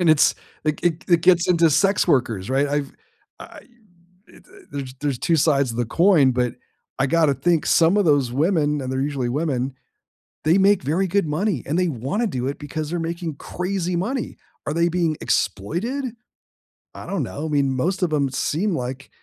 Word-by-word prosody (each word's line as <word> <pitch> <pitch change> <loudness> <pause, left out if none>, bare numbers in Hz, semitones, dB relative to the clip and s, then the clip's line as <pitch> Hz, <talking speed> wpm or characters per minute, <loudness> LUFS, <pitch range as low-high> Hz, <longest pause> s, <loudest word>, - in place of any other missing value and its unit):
And 175 - +2
it's 155 -2 +5 0.3
it 155 -1 -1
it 170 -2 0
it 170 -1 +5
gets 175 0 +4
into 170 -2 +4
sex 185 +6 +2
workers, 115 - +1
right? 135 +2 +2
I've 145 -1 -2 0.5
I've, - - -12 0.7
eh, - - -17
eh - - -16 0.3
there's 135 -2 -6
there's 140 -4 -1
2 165 - +1
sides 140 -3 +2
to 115 - -6
the 120 - 0
coin, 165 - +4
but 125 -1 -1 0.4
I 135 - +2
gotta 155 -1 +3
think 170 -1 +1
some 170 +5 +4
of 200 - +2
those 140 -5 +2
women, 150 0 +1
and 130 -1 -4
they're 130 0 -1
usually 140 -4 -2
women, 135 -2 -1 0.7
they 165 +5 +4
make 200 -2 +4
very 165 +8 0
good 195 -1 +1
money, 160 - -1
and 155 +5 -1
they 180 - +2
wanna 145 - -2
do 130 -9 -3
it 140 - -3
because 150 +1 -5
they're 175 - -2
making 165 -2 -4
crazy 180 +2 -3
money. 235 +9 -3 0.3
Are 150 - -2
they 170 +1 +2
being 170 -3 0
exploited? 175 - -1 0.9
I - - -9
don't 195 -6 -2
know. 145 +5 -5
I - - -4
mean, 140 -2 +1
most 185 +8 -1
of 170 -3 +1
'em 140 -2 +1
seem 170 +9 -1
like 130 0 -5
155 Hz, 195 wpm, -22 LUFS, 135-175 Hz, 0.9 s, it's